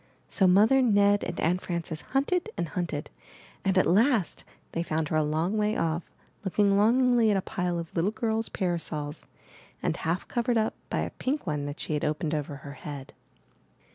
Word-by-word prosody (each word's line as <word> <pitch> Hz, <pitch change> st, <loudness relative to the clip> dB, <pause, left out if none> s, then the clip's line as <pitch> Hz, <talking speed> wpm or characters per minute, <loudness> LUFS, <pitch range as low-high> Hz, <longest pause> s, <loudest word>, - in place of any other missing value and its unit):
So 190 Hz, -, +2 dB
Mother, 215 Hz, +9 st, +5 dB
Ned, 205 Hz, -4 st, +4 dB
and 175 Hz, -, -4 dB
Aunt 180 Hz, +3 st, +1 dB
Frances 170 Hz, -3 st, -3 dB
hunted 350 Hz, +9 st, 0 dB
and 170 Hz, -, -2 dB
hunted, 165 Hz, -5 st, -3 dB, 0.5 s
and 190 Hz, 0 st, +1 dB
at 185 Hz, -, +5 dB
last 220 Hz, -, +2 dB, 0.3 s
they 165 Hz, -, -1 dB
found 160 Hz, -2 st, -1 dB
her -, -, -1 dB
a 155 Hz, -, +3 dB
long 160 Hz, +8 st, 0 dB
way 210 Hz, +1 st, +1 dB
off, 165 Hz, +1 st, -1 dB, 0.3 s
looking 200 Hz, +1 st, +2 dB
longingly 235 Hz, +2 st, +4 dB
at 205 Hz, -, +3 dB
a -, -, 0 dB
pile 180 Hz, -4 st, -2 dB
of 165 Hz, -1 st, -6 dB
little 170 Hz, +4 st, +2 dB
girls* 220 Hz, 0 st, -1 dB
parasols, 160 Hz, -5 st, -2 dB, 0.6 s
and -, -, +1 dB
half 165 Hz, +3 st, -2 dB
covered 240 Hz, 0 st, 0 dB
up 220 Hz, 0 st, +1 dB, 0.2 s
by -, -, 0 dB
a -, -, -3 dB
pink 280 Hz, +3 st, -2 dB
one 145 Hz, -4 st, -2 dB
that 145 Hz, -, -6 dB
she -, -, -3 dB
had 150 Hz, -, -1 dB
opened 150 Hz, +1 st, -1 dB
over 150 Hz, -1 st, -2 dB
her 140 Hz, +1 st, -9 dB
head. 140 Hz, -2 st, -8 dB
180 Hz, 185 wpm, -28 LUFS, 155-220 Hz, 0.6 s, Mother